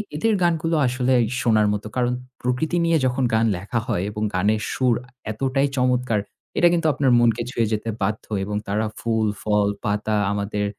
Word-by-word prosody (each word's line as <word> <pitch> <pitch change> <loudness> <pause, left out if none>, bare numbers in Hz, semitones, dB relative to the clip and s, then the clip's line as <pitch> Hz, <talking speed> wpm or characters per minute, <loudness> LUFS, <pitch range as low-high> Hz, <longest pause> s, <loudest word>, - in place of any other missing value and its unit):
এদের 220 +9 +1
গানগুলো 165 -1 +1
আসলে 125 +1 +1 0.3
শোনার 110 -3 +3
মতো। 105 +1 -4
কারণ 125 -1 +1 0.3
প্রকৃতি 125 +8 0
নিয়ে 165 -1 +3
যখন 130 +1 0
গান 110 +1 +3
লেখা 100 +6 -2
হয় 90 - 0
এবং 105 +1 -4
গানের 105 +3 +1
সুর 125 -3 +2 0.4
এতটাই 135 +5 0
চমৎকার, 125 -3 +1 0.4
এটা 175 - +6
কিন্তু 165 -2 +1
আপনার 135 -3 +2
মনকে 120 0 +3
ছুঁয়ে 115 -3 0
যেতে 110 +1 -2
বাধ্য 105 +2 -1 0.2
এবং 105 +1 -4
তারা 105 +2 0
ফুল-ফল, 105 -2 0 0.2
পাতা, 105 +1 0 0.2
আমাদের 105 0 -2
115 Hz, 160 wpm, -22 LUFS, 105-130 Hz, 0.4 s, এটা